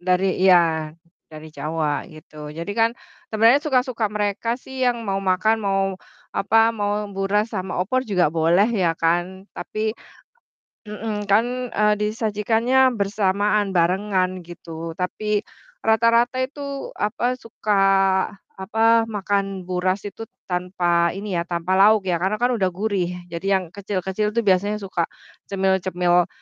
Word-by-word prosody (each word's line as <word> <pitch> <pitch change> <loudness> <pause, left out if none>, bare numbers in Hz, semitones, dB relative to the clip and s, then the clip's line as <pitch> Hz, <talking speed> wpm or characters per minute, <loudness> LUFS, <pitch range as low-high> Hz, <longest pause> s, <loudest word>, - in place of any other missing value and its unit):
Dari 185 +1 +1
iya, 185 -1 +7 0.7
dari 155 0 -11
Jawa, 150 +1 -2
gitu. 155 -2 -11
Jadi 165 +6 -5
kan 225 +1 +2 0.4
sebenernya 225 +5 +4
suka-suka 255 -6 0
mereka 210 +3 -1
sih 265 +1 -9
yang 245 -2 +1
mau 195 -1 -1
makan, 195 +4 +1
mau 195 -1 0 0.4
apa, 225 +3 +3
mau 205 -1 -1
buras 200 +3 0
sama 190 -3 -3
opor 255 +7 0
juga 180 -6 +2
boleh 165 +4 +3
ya 175 -6 +1
kan, 175 +3 -1
tapi 215 0 -3 0.9
mhm, 210 0 -4
kan, 215 +4 +5 0.3
eee, 210 -1 +3
disajikannya 225 +4 +2
bersamaan, 200 0 +1
barengan 185 +1 0
gitu. 165 -1 -8
Tapi 210 +3 -1 0.5
rata-rata 230 +2 +3
itu 280 +1 -6
apa, 245 +4 -1
suka 220 -2 -5 0.9
apa, 225 +3 +3
makan 195 -2 -2
buras 185 +2 -1
itu 225 +2 -7 0.2
tanpa 175 -1 +1
ini 200 +1 -5
ya, 170 - -4
tanpa 175 +2 0
lauk 210 +1 +6
ya, 170 - 0
karena 190 +4 0
kan 245 +3 +1
udah 190 - +2
gurih, 190 0 -1 0.2
jadi 170 +2 -6
yang 190 - -4
kecil-kecil 200 +1 -2
itu 235 - +3
biasanya 200 +2 +2
suka 175 -3 -1 0.4
cemil-cemil 185 -2 +1
200 Hz, 130 wpm, -22 LUFS, 180-220 Hz, 0.9 s, iya